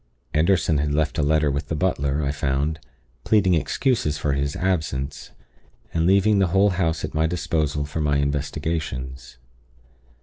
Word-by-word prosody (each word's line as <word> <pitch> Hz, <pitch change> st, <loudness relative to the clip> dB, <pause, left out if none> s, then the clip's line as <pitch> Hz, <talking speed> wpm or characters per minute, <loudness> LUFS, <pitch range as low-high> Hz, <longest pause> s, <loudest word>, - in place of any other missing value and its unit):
Anderson 80 Hz, -1 st, +2 dB
had 75 Hz, 0 st, 0 dB
left 80 Hz, 0 st, 0 dB
a -, -, +3 dB
letter 75 Hz, 0 st, +2 dB
with 70 Hz, +2 st, -3 dB
the 80 Hz, -, -2 dB
butler, 75 Hz, -4 st, 0 dB
I 70 Hz, -, 0 dB
found, 70 Hz, +2 st, -1 dB, 0.4 s
pleading 100 Hz, -4 st, +3 dB
excuses 80 Hz, -, 0 dB
for 75 Hz, -1 st, -1 dB
his 70 Hz, +1 st, -1 dB
absence, 80 Hz, -7 st, -2 dB, 0.6 s
and 80 Hz, 0 st, +1 dB
leaving 100 Hz, +2 st, +4 dB
the 95 Hz, -, +3 dB
whole 95 Hz, +4 st, +3 dB
house 85 Hz, -4 st, 0 dB
at -, -, -8 dB
my 80 Hz, +1 st, +2 dB
disposal 80 Hz, -4 st, -1 dB
for 75 Hz, +2 st, -4 dB
my 75 Hz, -1 st, +2 dB
investigations. 70 Hz, -3 st, -3 dB
75 Hz, 155 wpm, -23 LUFS, 70-85 Hz, 0.6 s, leaving